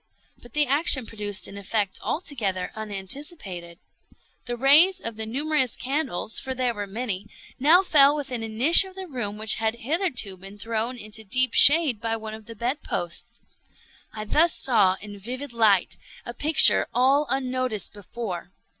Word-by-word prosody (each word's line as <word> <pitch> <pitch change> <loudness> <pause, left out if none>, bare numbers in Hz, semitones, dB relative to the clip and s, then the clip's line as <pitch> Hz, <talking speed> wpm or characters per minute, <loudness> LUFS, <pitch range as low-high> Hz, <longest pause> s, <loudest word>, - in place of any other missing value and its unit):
But 240 - -16
the 300 0 +2
action 275 -2 +4
produced 210 -3 -3
an 200 - -9
effect 200 0 -2
altogether 210 - -4
unanticipated. 200 - -6 0.7
The 240 0 -4
rays 310 +9 +6
of 230 -10 -5
the 220 0 -6
numerous 275 +1 -1
candles 260 - -2
(for 260 0 -5
there 250 -2 -1
were 205 -2 -6
many) 205 -2 -5 0.3
now 320 +8 +5
fell 290 -5 +5
within 265 -5 -5
a 225 - -5
niche 250 - +6
of 380 -1 -13
the 380 0 -7
room 225 -8 -6
which 215 0 +2
had 220 0 0
hitherto 250 - -2
been 195 +2 -12
thrown 225 +3 -3
into 220 0 -9
deep 250 +3 +2
shade 285 -7 +4
by 225 0 -2
one 220 -1 -8
of 220 -1 -12
the 230 - -10
bed 245 +7 -3
posts. 175 -2 -6 0.7
I 215 -1 -7
thus 320 +9 +3
saw 205 -7 +2
in 205 0 -10
vivid 250 +5 -7
light 215 -5 +2 0.3
a 240 - -7
picture 295 +3 +4
all 270 +4 +2
unnoticed 255 -5 -3
before. 200 -3 -8
235 Hz, 165 wpm, -24 LUFS, 210-280 Hz, 0.7 s, rays